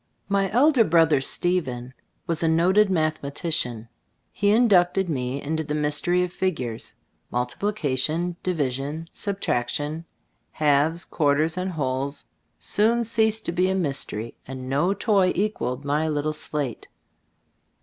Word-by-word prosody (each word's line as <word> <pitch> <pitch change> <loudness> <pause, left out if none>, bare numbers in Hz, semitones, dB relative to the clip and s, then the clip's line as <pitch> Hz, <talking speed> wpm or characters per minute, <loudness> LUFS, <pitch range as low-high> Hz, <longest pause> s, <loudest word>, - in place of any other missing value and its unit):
My 195 -1 +1
elder 255 +3 +4
brother, 160 -6 +4
Stephen, 130 -7 0 0.3
was 165 -1 -2
a 165 - +2
noted 185 +6 +4
mathematician. 155 -7 -1 0.4
He 205 - +1
inducted 195 -4 +4
me 130 -2 -2
into 160 +3 -2
the 150 0 -3
mystery 150 +4 +2
of 180 0 -4
figures. 130 -12 -2 0.3
Multiplication, 155 +4 -1
division, 150 -1 -2
subtraction, 155 - -2 0.5
halves, 155 +3 +2
quarters 155 +1 +1
and 185 0 -3
wholes, 140 -1 -2 0.3
soon 230 +3 +2
ceased 220 -1 +1
to - - -1
be 180 +2 +1
a 190 - 0
mystery, 135 - -3
and 130 -1 -7
no 150 +9 +1
toy 195 -5 +2
equalled 145 - -2
my 150 +2 0
little 150 0 -1
slate. 145 -5 -4
160 Hz, 120 wpm, -24 LUFS, 140-185 Hz, 0.5 s, elder